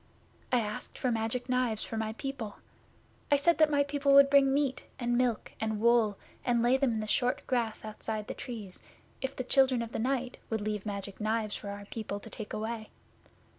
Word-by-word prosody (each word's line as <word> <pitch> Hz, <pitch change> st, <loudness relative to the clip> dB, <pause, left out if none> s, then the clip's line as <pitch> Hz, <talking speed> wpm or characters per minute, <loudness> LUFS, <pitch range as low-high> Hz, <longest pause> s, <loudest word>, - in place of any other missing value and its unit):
I 250 Hz, -2 st, +4 dB
asked 210 Hz, -1 st, -5 dB
for 255 Hz, -, 0 dB
Magic 230 Hz, +2 st, -1 dB
Knives 250 Hz, -4 st, +1 dB
for -, -, -5 dB
my 220 Hz, 0 st, -2 dB
people. 240 Hz, -4 st, -5 dB, 0.7 s
I 285 Hz, -, +6 dB
said 325 Hz, +4 st, +3 dB
that 310 Hz, -1 st, +6 dB
my 285 Hz, -1 st, +3 dB
people 280 Hz, 0 st, +1 dB
would 275 Hz, 0 st, +8 dB
bring 275 Hz, -1 st, +6 dB
meat, 275 Hz, -1 st, +1 dB, 0.2 s
and 240 Hz, -1 st, 0 dB
milk, 245 Hz, -3 st, +1 dB
and 220 Hz, -1 st, -1 dB
wool, 230 Hz, -3 st, +4 dB, 0.3 s
and 240 Hz, -2 st, +2 dB
lay 245 Hz, +2 st, +5 dB
them 265 Hz, -3 st, +2 dB
in 220 Hz, -, -1 dB
the -, -, -3 dB
short 250 Hz, +6 st, +1 dB
grass 235 Hz, -4 st, -1 dB
outside 215 Hz, 0 st, -4 dB
the -, -, -5 dB
Trees, 215 Hz, -7 st, -7 dB, 0.4 s
if 265 Hz, +1 st, -3 dB
the 255 Hz, -, -3 dB
Children 260 Hz, -2 st, +3 dB
of 230 Hz, -, -7 dB
the -, -, -3 dB
Night 255 Hz, +1 st, -1 dB
would 220 Hz, -2 st, -1 dB
leave 210 Hz, 0 st, -3 dB
Magic 200 Hz, 0 st, -5 dB
Knives 215 Hz, 0 st, 0 dB
for 205 Hz, -, -6 dB
our 200 Hz, 0 st, -6 dB
people 205 Hz, -1 st, -5 dB
to -, -, -12 dB
take 215 Hz, -, -7 dB
away. 220 Hz, 0 st, -4 dB
235 Hz, 205 wpm, -31 LUFS, 215-265 Hz, 0.7 s, would